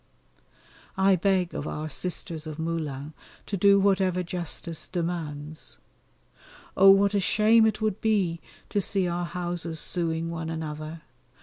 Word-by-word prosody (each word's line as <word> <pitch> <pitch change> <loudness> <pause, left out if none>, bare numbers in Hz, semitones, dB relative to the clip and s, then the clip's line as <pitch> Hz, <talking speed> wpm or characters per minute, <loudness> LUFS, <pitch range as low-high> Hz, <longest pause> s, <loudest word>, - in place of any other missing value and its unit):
I 190 0 +5
beg 185 -1 +1
of 145 - -4
our 155 +1 -4
Sisters 165 0 -2
of 155 -1 -6
Moulins 155 -3 -4 0.3
to 205 - -3
do 200 +1 +5
whatever 190 -2 +2
justice 170 -2 -5
demands. 160 -3 -5 1.0
Oh! 195 +1 +7
what 200 +1 +5
a 200 - +3
shame 220 +3 +4
it 215 0 -2
would 215 -2 -1
be 195 -7 +1 0.3
to 205 - 0
see 190 -1 0
our 175 0 -2
houses 175 -1 -4
sueing 165 0 0
one 165 -1 -4
another! 155 0 -6
175 Hz, 135 wpm, -26 LUFS, 160-195 Hz, 1.0 s, Oh